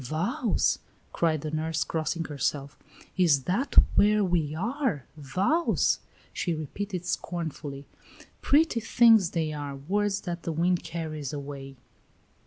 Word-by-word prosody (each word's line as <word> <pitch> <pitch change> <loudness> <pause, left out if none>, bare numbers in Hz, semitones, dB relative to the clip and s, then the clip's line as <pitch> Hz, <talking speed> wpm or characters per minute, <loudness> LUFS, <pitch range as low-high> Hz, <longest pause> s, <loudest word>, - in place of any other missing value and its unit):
"Vows!" 195 - 0 0.3
cried 160 -3 +1
the 155 - -4
nurse, 160 0 -1
crossing 160 +1 -2
herself. 140 0 -2 0.4
"Is 160 -7 +4
that 215 - -1 0.2
where 210 0 +4
we 165 -5 0
are! 230 - -1
Vows!" 190 - +1 0.3
she 170 -3 -1
repeated, 180 +4 -5
scornfully; 160 -5 -4 0.6
"pretty 295 -4 +3
things 225 -4 +5
they 160 -3 -1
are 145 -2 -5
words 195 +8 -1
that 175 -1 -5
the 165 - -3
wind 175 +2 +1
carries 155 -4 -5
away." 140 -1 -7
165 Hz, 120 wpm, -27 LUFS, 150-200 Hz, 0.6 s, things